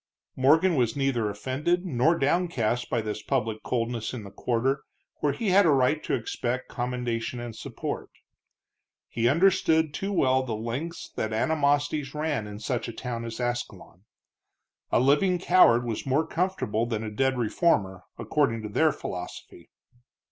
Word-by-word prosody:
Morgan 160 +8 +4
was 120 -4 +1
neither 135 -6 0
offended 140 - -1
nor 160 +1 +2
downcast 135 -7 0
by 120 - 0
this 105 -1 -4
public 115 -5 -1
coldness 115 -1 -2
in 115 - -6
the 100 - -10
quarter 130 +5 0 0.4
where 145 - +1
he 220 +6 -2
had 195 +2 +6
a 165 - +4
right 140 +2 +3
to - - 0
expect 120 +2 -3
commendation 120 -1 -3
and 120 -2 -6
support. - - -5 1.0
He 120 +1 +1
understood 160 -1 +3
too 195 +5 -3
well 130 -8 +3
the 120 -4 -3
lengths 125 +10 -5
that 110 0 -2
animosities 145 +2 +1
ran 150 -8 -1
in 105 0 -7
such 115 +3 -3
a - - -4
town 115 -1 -5
as 115 0 -6
Ascalon. 120 -6 -4 0.9
A - - +4
living 150 +8 +3
coward 175 -10 +5
was 115 -3 -3
more 140 +4 +1
comfortable 160 - -1
than 110 -2 -2
a 110 - -5
dead 130 +4 +1
reformer, 105 - +1 0.2
according 115 -7 0
to 105 - -5
their 155 +9 +3
philosophy. 90 -9 -8
125 Hz, 155 wpm, -27 LUFS, 115-155 Hz, 1.0 s, had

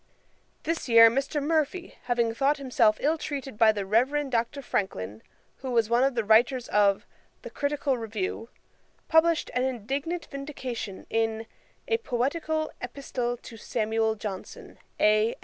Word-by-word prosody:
This 325 -4 -2
year 230 -1 +8
Mr. 275 +4 -1
Murphy, 320 +3 -1
having 235 -2 +1
thought 275 +5 +2
himself 245 -6 +2
ill 310 +3 +1
treated 275 -5 -5
by 220 0 +6
the 205 -2 -4
Reverend 265 +7 +1
Dr. 240 +4 -1
Francklin, 110 - -3 0.4
who 260 - -6
was 230 -2 +1
one 240 +2 +4
of 270 -1 +1
the 230 - +1
writers 240 +4 +3
of 200 -1 +3 0.4
The - - -8
Critical 285 -3 -1
Review, 225 0 -4 0.6
published 320 0 +3
an 250 - +1
indignant 270 +7 -3
vindication 260 -8 -6
in 225 0 0 0.4
_A 460 -1 0
Poetical 310 - -1
Epistle 245 -1 -3
to 225 - -10
Samuel 220 0 0
Johnson, 205 -3 -8 0.2
A. 215 +2 +3
245 Hz, 140 wpm, -27 LUFS, 225-285 Hz, 0.6 s, year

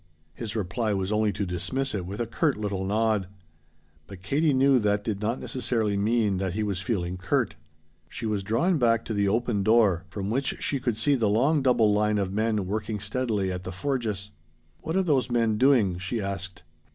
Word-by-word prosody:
His 110 +7 -5
reply 105 +1 -1
was 95 +1 -2
only 105 0 +2
to 100 0 -2
dismiss 130 +9 -2
it 95 -4 -3
with 100 +2 -6
a 120 - 0
curt 140 +4 0
little 100 -3 -2
nod. 105 -1 +1 0.8
But 95 -2 -11
Katie 150 +10 +2
knew 135 0 +4
that 105 -1 +1
did 105 -2 -3
not 115 +4 -1
necessarily 115 -5 -1
mean 105 -1 +1
that 95 -2 -2
he 110 +2 -1
was 100 -3 -2
feeling 90 -3 -2
curt. 120 +7 0 0.6
She 115 - -6
was 105 -2 -1
drawn 125 - +1
back 115 -2 +2
to 110 - -3
the 100 -1 +1
open 110 0 +1
door 100 -5 +3
from 100 +2 -4
which 135 +4 0
she 140 - -1
could 120 -4 -1
see 145 - +2
the 115 -6 +2
long 135 +9 +3
double 120 -5 +3
line 105 0 +2
of 95 -2 -1
men 110 -1 0
working 105 +2 -3
steadily 105 -2 -1
at 90 0 -5
the 95 - -5
forges. 105 -2 -3 0.5
"What 160 - -4
are 190 - +3
those 140 -7 +1
men 115 -3 +1
doing?" 115 -10 +3
she 90 +6 -3
asked. 95 -2 -4
105 Hz, 200 wpm, -26 LUFS, 100-120 Hz, 0.8 s, knew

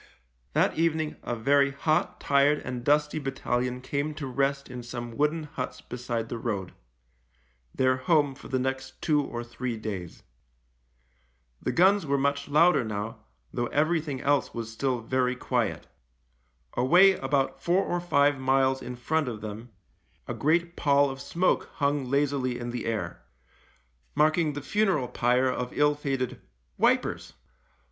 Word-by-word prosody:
That - - +2
evening 160 -2 0
a 120 - -3
very 140 +4 +3
hot, 155 +3 0
tired, 140 +1 +3
and 125 -1 -4
dusty 150 +2 +2
battalion 125 -2 -2
came 145 +3 -2
to 150 -2 -5
rest 140 +1 -1
in 125 -1 -7
some 120 -1 -6
wooden 150 +3 +1
huts 145 -4 -5
beside 120 -2 -4
the 115 - -5
road 100 -6 -3 0.5
— - - -37
their 130 0 +3
home 145 -1 +2
for - - -12
the 130 - -1
next 130 +1 -3
two 150 -2 +2
or 120 -3 -5
three 120 0 -4
days. 100 -6 -6 1.4
The - - -1
guns 190 0 +4
were 140 0 +2
much 140 +1 0
louder 155 0 +4
now, 110 0 -4 0.3
though 120 0 -1
everything 150 -2 0
else 145 -1 +1
was 115 -1 -4
still 125 +1 -1
very 125 +2 0
quiet. - - -1 0.9
Away 175 +10 +6
about 135 -4 -1
four 180 +3 +2
or 175 0 -2
five 145 -5 +3
miles 130 0 +2
in 125 0 -6
front 150 +4 0
of 110 -3 -5
them 110 +3 -7 0.6
a - - -3
great 170 +3 +1
pall 140 -2 +3
of 135 - -8
smoke 180 +2 0
hung 140 -1 0
lazily 140 -3 0
in 120 0 -5
the 120 -1 -4
air 115 -2 -3 0.5
— - - -37
marking 155 +1 +3
the 145 -1 -6
funeral 195 -9 +1
pyre 125 +1 +2
of 125 -1 -3
ill 150 0 +4
fated 135 -3 -3 0.2
" - - -43
Wipers." - - +1
135 Hz, 155 wpm, -27 LUFS, 120-150 Hz, 1.4 s, Away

